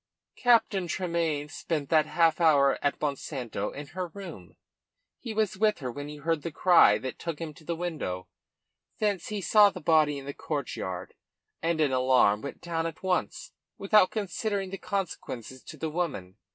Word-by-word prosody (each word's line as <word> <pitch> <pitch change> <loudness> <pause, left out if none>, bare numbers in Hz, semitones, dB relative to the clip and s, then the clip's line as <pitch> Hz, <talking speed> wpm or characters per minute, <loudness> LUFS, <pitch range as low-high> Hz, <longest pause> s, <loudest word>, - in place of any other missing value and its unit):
"Captain 225 -6 +3
Tremayne 165 -4 -1
spent 150 -1 -3
that 155 -1 +4
half 165 0 +2
hour 140 -4 +4
at 145 - 0
Monsanto 135 -7 -3
in 145 - -7
her 180 +4 -5
room. 165 - -10 0.6
He 235 - -6
was 215 -3 0
with 215 -1 +3
her 130 -5 -4
when 145 +3 -6
he 150 - -7
heard 155 +1 -1
the 165 - -5
cry 165 - +6
that 130 +4 -6
took 165 -3 -4
him 160 -1 -6
to 150 - -17
the 170 +2 -3
window. 155 - -4 0.7
Thence 205 -5 0
he 210 -2 -3
saw 205 +2 +6
the - - -8
body 155 -2 +3
in 135 - -8
the 140 - -5
courtyard, 125 - -4 0.5
and 165 0 0
in 150 -3 +3
alarm 130 -5 +3
went 140 - -7
down 165 -1 -2
at 165 - -9
once 185 -1 -1 0.3
without 195 -1 +4
considering 200 -1 -2
the 195 - -5
consequences 130 - -4
to 155 - -10
the 155 +2 -3
woman. 125 - -3
160 Hz, 175 wpm, -28 LUFS, 140-185 Hz, 0.7 s, cry